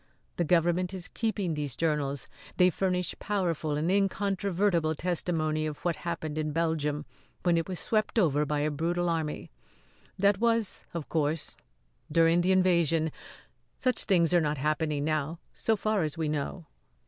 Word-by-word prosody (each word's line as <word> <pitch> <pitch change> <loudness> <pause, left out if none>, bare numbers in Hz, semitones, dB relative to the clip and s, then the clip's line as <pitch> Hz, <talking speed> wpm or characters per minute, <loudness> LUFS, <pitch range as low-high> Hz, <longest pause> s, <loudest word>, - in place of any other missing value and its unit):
The 175 - +2
government 175 +3 +2
is 180 -1 -6
keeping 210 -6 -1
these 145 -4 -3
journals. 145 -4 -1 0.3
They 180 -1 +5
furnish 180 0 -1
powerful 170 -7 -1
and 160 +4 0
incontrovertible 195 -4 +1
testimony 155 -2 0
of 150 +2 -7
what 170 -3 +1
happened 155 -3 -4
in 155 -1 -1
Belgium 150 -2 0 0.4
when 175 -1 +3
it 165 +2 -1
was 185 - -3
swept 215 +1 0
over 150 -8 +3
by 150 0 -1
a 150 +1 +1
brutal 170 +4 0
army. 160 - -2 0.7
That 200 0 +3
was, 230 -2 +1
of 165 -4 -4
course, 155 -1 -1 0.6
during 165 +2 +4
the 185 +2 +2
invasion 170 -4 +3 0.7
such 255 -2 0
things 175 -4 +3
are 175 - +5
not 150 -1 0
happening 150 +1 0
now 155 +1 -1 0.2
so 225 - +1
far 215 -1 0
as 155 0 -2
we 160 -1 -1
know." 150 +3 -3
165 Hz, 155 wpm, -29 LUFS, 155-185 Hz, 0.7 s, They